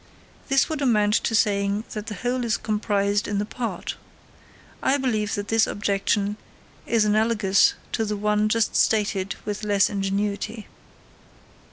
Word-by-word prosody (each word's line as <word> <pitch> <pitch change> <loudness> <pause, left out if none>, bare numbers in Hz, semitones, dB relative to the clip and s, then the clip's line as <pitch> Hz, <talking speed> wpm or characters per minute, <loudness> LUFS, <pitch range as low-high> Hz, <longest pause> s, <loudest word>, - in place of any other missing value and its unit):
This 270 0 +3
would 310 -3 -4
amount 210 -6 +3
to 225 - +1
saying 200 -1 +1
that 210 0 -6
the 210 - -5
whole 245 +5 -2
is 225 -3 0
comprised 205 -1 0
in 205 - -2
the 205 - 0
part. 235 +2 -5 0.8
I 275 - +2
believe 220 -6 -1
that 205 0 -5
this 225 0 +3
objection 205 0 0 0.5
is 225 -2 +3
analogous 210 -2 +3 0.2
to 225 - 0
the 210 -1 -2
one 210 +1 +1
just 230 0 +1
stated 200 -3 +1
with 210 0 -4
less 205 -1 +2
ingenuity. 200 +2 -2
210 Hz, 145 wpm, -24 LUFS, 205-225 Hz, 0.8 s, This